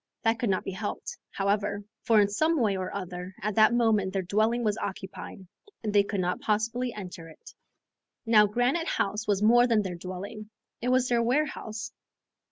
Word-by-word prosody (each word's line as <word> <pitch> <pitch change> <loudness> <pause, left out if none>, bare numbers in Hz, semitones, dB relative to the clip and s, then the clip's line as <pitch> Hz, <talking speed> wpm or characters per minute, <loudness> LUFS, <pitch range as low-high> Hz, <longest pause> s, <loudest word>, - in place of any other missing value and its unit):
That 225 0 +2
could 235 - 0
not 190 - +1
be - - -4
helped, 205 +3 -5
however, 200 +1 -1 0.2
for 220 -1 +4
in 205 - +5
some 310 +10 +1
way 210 -5 +2
or 185 -1 -3
other 180 -1 -6
at 210 +1 0
that 215 +2 +5
moment 220 -5 +2
their 195 -1 -1
dwelling 220 +6 +1
was 210 -2 +1
occupied, 190 0 -6 0.4
and 210 -2 -2
they 205 - +6
could 200 0 -3
not 180 0 -1
possibly 230 +4 0
enter 180 -6 -8
it. 160 - -15 0.7
Now 215 -2 +6
Granite 245 +10 0
House 210 +2 -1
was 205 -1 +1
more 240 +3 +6
than 225 -3 +3
their 185 -2 -4
dwelling, 185 +4 -7 0.3
it 245 - -1
was 255 0 +3
their 240 -1 +2
warehouse. 235 -4 -1
210 Hz, 180 wpm, -28 LUFS, 195-230 Hz, 0.7 s, they